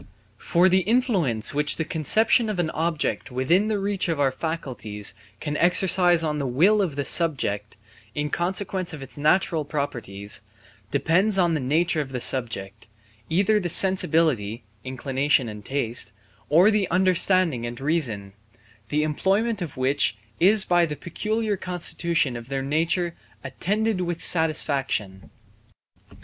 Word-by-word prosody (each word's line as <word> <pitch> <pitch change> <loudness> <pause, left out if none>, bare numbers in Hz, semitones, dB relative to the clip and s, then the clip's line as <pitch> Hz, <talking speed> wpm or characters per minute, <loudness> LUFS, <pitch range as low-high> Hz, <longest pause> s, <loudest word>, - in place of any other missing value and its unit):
For 175 +2 +3
the 190 0 +4
influence 190 - +1
which 150 +1 +1
the 160 - -3
conception 220 - +2
of 210 - -3
an 170 -3 -1
object 160 -4 -2
within 160 +11 +1
the 215 -1 0
reach 200 -1 -1
of 160 -3 -1
our 135 -2 +2
faculties 130 -9 -4 0.3
can 150 -1 -4
exercise 180 -1 +3
on 150 -1 -2
the 140 - -2
will 185 +12 +3
of 170 -8 -2
the 140 -1 -3
subject, 105 - 0 0.4
in 145 0 -2
consequence 185 0 -2
of 145 -4 -7
its 135 - -12
natural 155 +2 +1
properties, 120 -10 -4 0.5
depends 175 - +1
on 175 -3 +2
the 155 - 0
nature 155 +4 +1
of 140 - -6
the 125 - -2
subject, 115 -5 0 0.4
either 200 +6 +2
the 175 -3 -3
sensibility 155 - +2 0.2
(inclination 135 +1 0
and 105 -1 -8
taste), 120 -6 -2 0.4
or 175 +8 +5
the 205 -3 0
understanding 180 -7 +2
and 120 0 -7
reason, 130 -10 -2 0.6
the 150 +1 0
employment 195 +8 0
of 160 -7 -6
which 130 -3 +1 0.2
is 195 +3 +4
by 175 -1 +3
the 150 - -5
peculiar 215 +6 -2
constitution 170 -6 -1
of 120 +1 -9
their 135 -1 -2
nature 165 +4 0 0.3
attended 200 +9 -1
with 175 -2 -3
satisfaction. 140 - -1
160 Hz, 140 wpm, -24 LUFS, 130-185 Hz, 0.6 s, or